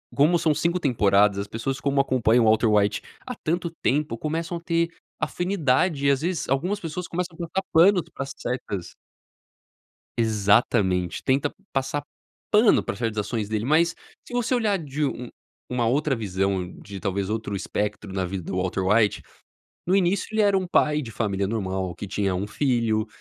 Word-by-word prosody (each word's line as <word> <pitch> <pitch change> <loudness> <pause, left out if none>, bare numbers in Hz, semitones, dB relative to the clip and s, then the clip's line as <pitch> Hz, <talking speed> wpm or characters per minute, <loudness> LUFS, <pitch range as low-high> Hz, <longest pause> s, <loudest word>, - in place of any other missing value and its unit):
como 155 +5 +4
são 155 -2 +2
5 170 +4 0
temporadas, 105 - +3
as 100 +1 -3
pessoas 130 +5 -3
como 140 0 +1
acompanham 120 -3 +3
o - - +4
Walter 110 +1 +4
White 105 -1 +2 0.2
há 250 -2 -5
tanto 170 0 -2
tempo, 140 -4 0
começam 165 +4 -3
a - - -10
ter 170 0 +1 0.3
afinidade 165 -4 +1
e, - - +6
às 135 0 +1
vezes 175 0 -2
algumas 175 +11 0
pessoas 170 0 -5
começam 175 -1 -3
a - - -19
passar 190 +3 -2
panos 180 +1 +6
pra 135 - -4
certas 125 -8 -5 1.2
Exatamente. 100 -4 +2
Tenta 135 +2 +1 0.2
passar 135 +1 -1 0.5
pano 215 +1 +5
pra - - -4
certas 110 -1 -2
ações 105 0 -2
dele, 110 0 -1
mas 160 +5 +3 0.4
se - - -12
você 245 +1 0
olhar 215 -5 +1
de 150 -2 -3
um 125 -3 -3 0.4
uma 125 -2 0
outra 140 +2 +1
visão, 95 -3 -1
de 100 -1 -8
talvez 100 0 -2
outro 110 -1 -3
espectro 105 +1 -3
na 95 0 -2
vida 90 +1 -4
do 90 - -5
Walter 95 +1 -1
White, 105 +1 +3 0.7
no 185 - +2
início 190 0 +2
ele 220 - +1
era 200 -2 +4
um 185 -1 0
pai 150 -3 +2
de 115 - -7
família 100 -3 -1
normal 95 -4 -2
que 100 - -7
tinha 100 -2 0
1 95 +3 -2
filho, 115 -2 0
125 Hz, 175 wpm, -25 LUFS, 105-165 Hz, 1.2 s, e